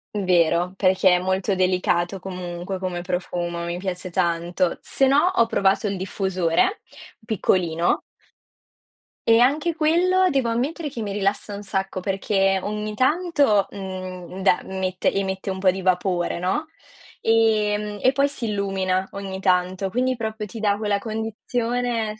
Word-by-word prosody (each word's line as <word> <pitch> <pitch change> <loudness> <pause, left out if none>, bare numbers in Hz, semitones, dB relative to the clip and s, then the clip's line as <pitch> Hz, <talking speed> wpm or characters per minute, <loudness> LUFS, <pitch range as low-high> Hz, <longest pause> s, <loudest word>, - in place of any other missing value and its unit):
Vero, 180 -2 +2
perché 190 0 +3
è - - -2
molto 190 +2 0
delicato 185 0 +1
comunque 180 0 -5
come 180 -2 -3
profumo, 175 -1 -3
mi 170 0 -3
piace 185 0 -4
tanto. 175 0 0
Se 270 - +1
no, 275 +2 +5 0.2
ho 230 - +5
provato 195 -1 +1
il 195 -1 -2
diffusore, 190 - 0 0.4
piccolino 175 -6 +1 1.3
e 225 0 +6
anche 300 +7 +2
quello, 360 +4 +3
devo 270 -6 +1
ammettere 290 +7 -2
che 245 -4 -6
mi 205 -2 -3
rilassa 205 +1 -1
un 200 - -6
sacco, 195 -1 -3
perché 195 0 +1
ogni 210 0 -3
tanto, 285 - +2
mhmm, 185 -1 -7
de 190 -2 +4
met 185 -1 -4
emette 190 0 0
un 190 - -5
po' 190 0 +4
di 190 +1 -1
vapore, 180 -1 0
no, 190 - -1 0.6
ehm, 210 -2 +2
e 260 - +5
poi 275 +1 +2
si 280 -4 -5
illumina 190 -2 -1
ogni 195 -1 -6
tanto, 185 0 +1
quindi, 255 +5 0
proprio 220 -2 -4
ti 225 - -8
dà 205 -1 +1
quella 205 -1 0
condizione 225 +1 -2
195 Hz, 145 wpm, -23 LUFS, 185-225 Hz, 1.3 s, e